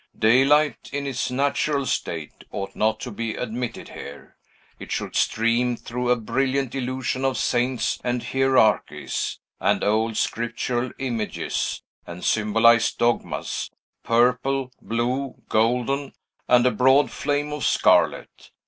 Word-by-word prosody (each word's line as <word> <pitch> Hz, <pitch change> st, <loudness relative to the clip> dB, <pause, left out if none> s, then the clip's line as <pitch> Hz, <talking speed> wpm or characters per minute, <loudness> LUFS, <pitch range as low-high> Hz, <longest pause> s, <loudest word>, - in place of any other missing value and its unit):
Daylight, 135 Hz, +5 st, +3 dB
in 140 Hz, +1 st, -3 dB
its 135 Hz, -2 st, -2 dB
natural 140 Hz, +2 st, 0 dB
state, 80 Hz, -10 st, -4 dB
ought 100 Hz, -1 st, -5 dB
not 110 Hz, 0 st, +1 dB
to 125 Hz, -, -5 dB
be 110 Hz, +1 st, -4 dB
admitted 120 Hz, 0 st, -5 dB
here. 70 Hz, +1 st, -10 dB, 0.4 s
It -, -, -9 dB
should -, -, -3 dB
stream 115 Hz, +2 st, +1 dB
through 125 Hz, +1 st, -4 dB
a 125 Hz, -, +5 dB
brilliant 130 Hz, +3 st, -1 dB
illusion 130 Hz, 0 st, -2 dB
of 135 Hz, -3 st, +1 dB
saints 125 Hz, +2 st, 0 dB
and 120 Hz, -1 st, -1 dB
hierarchies, 130 Hz, -6 st, +1 dB, 0.2 s
and -, -, +1 dB
old 110 Hz, +1 st, +1 dB
scriptural 120 Hz, +1 st, -1 dB
images, 120 Hz, -5 st, -3 dB, 0.2 s
and 85 Hz, +1 st, -7 dB
symbolized 115 Hz, +2 st, +3 dB
dogmas, 120 Hz, 0 st, -1 dB, 0.3 s
purple, 125 Hz, +3 st, +1 dB
blue, 125 Hz, +4 st, -2 dB
golden, 125 Hz, +5 st, +1 dB, 0.3 s
and 125 Hz, 0 st, +5 dB
a 125 Hz, -, +4 dB
broad 130 Hz, +3 st, +4 dB
flame 145 Hz, +1 st, -1 dB
of 150 Hz, -, -4 dB
scarlet. -, -, +2 dB
125 Hz, 120 wpm, -24 LUFS, 115-135 Hz, 0.4 s, a